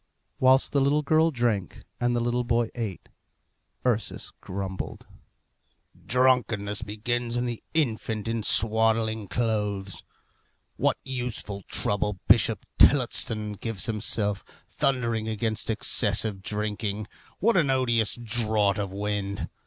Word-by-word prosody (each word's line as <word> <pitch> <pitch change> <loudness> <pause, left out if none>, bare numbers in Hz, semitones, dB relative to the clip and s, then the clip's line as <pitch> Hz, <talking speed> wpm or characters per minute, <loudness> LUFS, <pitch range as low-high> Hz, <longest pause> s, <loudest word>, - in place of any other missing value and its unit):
Whilst 130 +2 +4
the 140 - +3
little 145 +2 +2
girl 160 +3 +4
drank, 120 - -1 0.2
and 120 0 +1
the - - +2
little 120 +1 0
boy 120 -1 +1
ate, 110 -7 -5 0.8
Ursus 115 -4 -1
grumbled, 95 0 -5 1.0
"Drunkenness 120 -5 +2
begins 115 +3 -2
in 120 - 0
the 120 -2 -4
infant 110 -7 -1
in 115 0 -1
swaddling 110 0 +2
clothes. 105 -4 -2 0.7
What - - +1
useful 120 -6 -4
trouble 105 -1 0
Bishop 105 -1 +4
Tillotson 115 -5 +4
gives 105 -2 -3
himself, 105 -2 0 0.2
thundering 115 -5 0
against 110 0 -2
excessive 105 -2 0
drinking. 105 +1 -3 0.3
What 230 +3 +2
an 160 -6 +3
odious 120 -5 +2
draught 110 -3 +1
of 100 -2 -2
wind! 100 0 -3
110 Hz, 115 wpm, -26 LUFS, 105-120 Hz, 1.0 s, Whilst